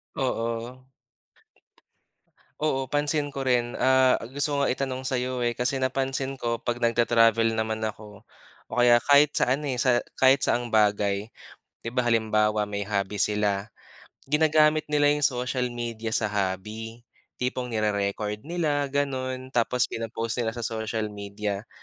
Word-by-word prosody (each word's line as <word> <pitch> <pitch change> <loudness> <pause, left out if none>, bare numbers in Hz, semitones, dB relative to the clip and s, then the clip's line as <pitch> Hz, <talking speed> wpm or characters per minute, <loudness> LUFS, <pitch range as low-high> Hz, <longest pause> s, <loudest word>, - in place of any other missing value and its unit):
Oo. 120 0 -3 1.7
Oo, 135 -4 0
pansin 145 0 +1
ko 135 -1 -5
rin, 120 -1 +1
ah, 130 -1 +4 0.2
gusto 145 0 0
ko 140 - +2
ngang - - +1
itanong 130 -1 -4
sa'yo 125 -1 -1
eh, 120 - +1
kasi 130 +4 0
napansin 135 0 -2
ko 115 0 -1
'pag 120 +1 -4
nagta-travel 115 -1 +3
naman 110 0 -1
ako 105 -2 -8 0.4
o - - -26
kaya 120 0 +5
kahit 145 +4 +5
sa 125 - +3
ano, 145 0 -3
eh, 125 - -2
sa 125 -1 +3 0.2
kahit 130 +1 +5
saan 120 0 +2
ang - - -5
bagay, 105 0 +2 0.5
di 115 - -6
ba 125 +1 -1
halimbawa 110 -2 +1
may 100 0 -3
hobby 100 0 -2
sila, 105 0 0 0.5
ginagamit 155 +1 +3
nila 145 -1 +2
yung 150 - -2
social 125 -2 0
media 115 -2 -4
sa 110 -1 +1
hobby 105 +4 -4 0.3
tipong 125 0 -3
nire-record 105 -1 -1
nila 150 -4 -1
ganon, 130 -2 -3
tapos 125 +1 +2
pino-post 115 +1 -3
nila 110 - 0
sa 115 0 -4
social 110 -1 -3
media. 100 +1 -5
120 Hz, 145 wpm, -26 LUFS, 110-130 Hz, 1.7 s, kaya